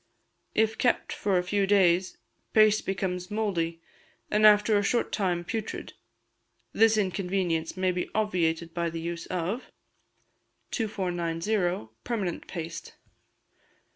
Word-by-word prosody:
If 220 0 +2
kept 250 - +1
for 200 -2 0
a 180 - +1
few 195 +2 0
days, 185 -2 +3 0.4
paste 215 -1 +5
becomes 185 -2 -2
mouldy, 170 -6 -2 0.5
and 215 +1 +6
after 210 +1 +5
a 205 - +4
short 235 +4 0
time 180 -4 0
putrid; 220 +4 -5 0.8
this 225 0 +4
inconveince 185 -4 -1
may 185 0 +2
be 180 0 -3
obviated 170 -6 0
by 170 -1 -1
the 165 0 -5
use 170 0 -5
of: 185 +7 -3 1.0
2490. 180 - -1
Permanent 200 -7 -3
Paste. 165 -2 -6
185 Hz, 115 wpm, -28 LUFS, 170-210 Hz, 1.0 s, and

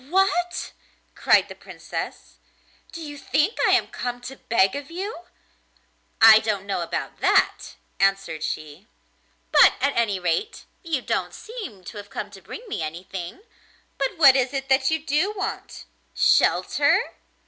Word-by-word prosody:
'What!' 360 -1 0 0.4
cried - - +3
the - - -9
Princess, - - -8 0.5
'do 335 -3 -8
you 290 -1 -8
think 310 +12 0
I - - +4
am - - +3
come 245 -1 -5
to 255 +2 -8
beg 195 -4 +1
of 285 0 -6
you?' 360 +1 -6 1.0
'I 220 -1 +10
don't 210 -3 -2
know 195 -3 -2
about 170 - -5
that,' - - +1 0.2
answered 195 -5 +1
she; 155 +4 -6 0.6
'but - - +7
at 280 0 0
any 215 -5 +1
rate 180 - -2 0.2
you 315 -7 -2
don't - - -2
seem 415 - -9
to 195 - -10
have 205 0 -9
come 205 +1 -6
to 195 -1 -13
bring 470 - -10
me 410 - -4
anything. 175 - -6 0.6
But 275 +4 -1
what 275 -5 +7
is 260 0 +1
it 270 0 -4
that 265 0 +3
you 320 -1 -2
do 320 +9 +1
want? 390 - -5 0.3
Shelter? - - +3
260 Hz, 150 wpm, -23 LUFS, 195-325 Hz, 1.0 s, I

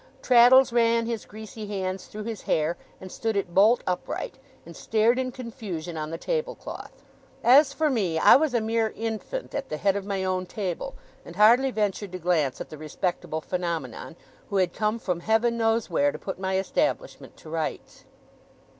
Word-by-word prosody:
Traddles 255 +1 +6
ran 230 -1 +3
his 230 -1 -4
greasy 215 0 -9
hands 190 -2 -4
through 215 0 -7
his 225 -2 -5
hair, 155 +2 0 0.2
and 185 -1 -10
stood 225 -1 -2
it 190 -3 -2
bolt 215 +6 +5
upright, 180 -1 -4 0.3
and - - -11
stared 225 +3 +2
in 255 -1 -2
confusion 215 -10 -6
on 155 -1 -4
the 165 - -4
table - - -2
cloth. - - -10 0.4
As 275 +4 +6
for 310 +2 0
me, 200 - 0
I - - +7
was 285 -2 +2
a 235 - +2
mere 225 0 0
infant 225 - -4
at 275 -1 -4
the 155 - -3
head 195 +4 +1
of 200 - -2
my 195 -2 -2
own 185 -1 -1
table; 185 -3 -4 0.3
and 170 - -11
hardly 235 +7 +5
ventured 205 -4 -2
to - - -3
glance 160 -7 0
at - - -7
the 155 - -9
respectable 160 0 -3
phenomenon, 170 -1 -4 0.3
who 200 - -1
had 185 -2 +1
come 215 +1 0
from 180 -6 -2
Heaven 225 +5 +2
knows 225 -1 +1
where, 145 -5 +2
to 155 - -7
put 190 +3 -6
my 190 0 -1
establishment 350 - -2
to 155 - -12
rights. 160 -1 -4
210 Hz, 185 wpm, -26 LUFS, 180-235 Hz, 0.4 s, I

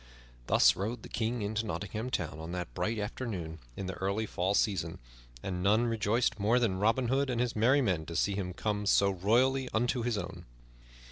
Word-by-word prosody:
Thus - - +5
rode 110 +4 -3
the - - -9
King 115 0 -1
into 110 +2 -1
Nottingham 105 +4 -4
Town 80 -9 -3
on 80 +2 -6
that 90 -9 -4
bright 110 - -1
afternoon 100 -7 -4 0.2
in 95 - -4
the 95 - -3
early 100 +4 -1
fall 95 0 -1
season; 85 -7 0 0.5
and 90 -2 -3
none 105 +5 +3
rejoiced 115 0 +1
more 110 +5 +3
than 105 -7 +1
Robin 115 +4 +2
Hood 135 +1 +1
and 120 -2 -1
his 120 -1 0
merry 125 +6 +4
men 85 -8 0
to 85 - -6
see 100 +3 +1
him 95 -2 -3
come 105 +1 -2
so 100 0 +4
royally 125 +8 +2
unto 120 +2 +1
his 115 -2 0
own. - - -6
105 Hz, 195 wpm, -31 LUFS, 95-120 Hz, 0.5 s, Thus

